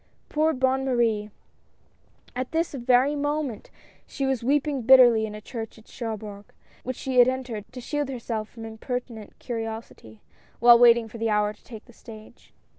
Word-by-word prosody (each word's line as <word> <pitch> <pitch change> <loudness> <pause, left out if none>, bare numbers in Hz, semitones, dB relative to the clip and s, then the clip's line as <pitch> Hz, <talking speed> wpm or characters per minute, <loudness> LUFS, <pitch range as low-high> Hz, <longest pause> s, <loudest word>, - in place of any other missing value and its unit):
Poor 310 +1 +2
Bonne 265 -1 0
Marie! 230 -5 0 1.1
At 255 +2 -4
this 330 0 0
very 255 +2 +2
moment 290 -5 -3 0.4
she 275 - -3
was 265 -3 -1
weeping 285 +1 0
bitterly 240 -3 +6
in 210 - -8
a 210 - -9
church 225 0 -7
at 220 - -18
Cherbourg, 215 -3 -7 0.3
which 255 +1 -5
she 260 0 -1
had 245 - +8
entered 250 -5 -3
to 255 - -9
shield 290 +3 -3
herself 230 -4 -4
from 225 -1 -10
impertinent 225 -1 -6
curi 230 -3 -4
osity, 220 - -10 0.4
while 235 0 +7
waiting 235 -1 +6
for 225 +1 -11
the 225 0 0
hour 210 0 +1
to 210 - -27
take 220 -3 -11
the 240 - -18
stage. 220 0 -14
240 Hz, 170 wpm, -25 LUFS, 220-265 Hz, 1.1 s, had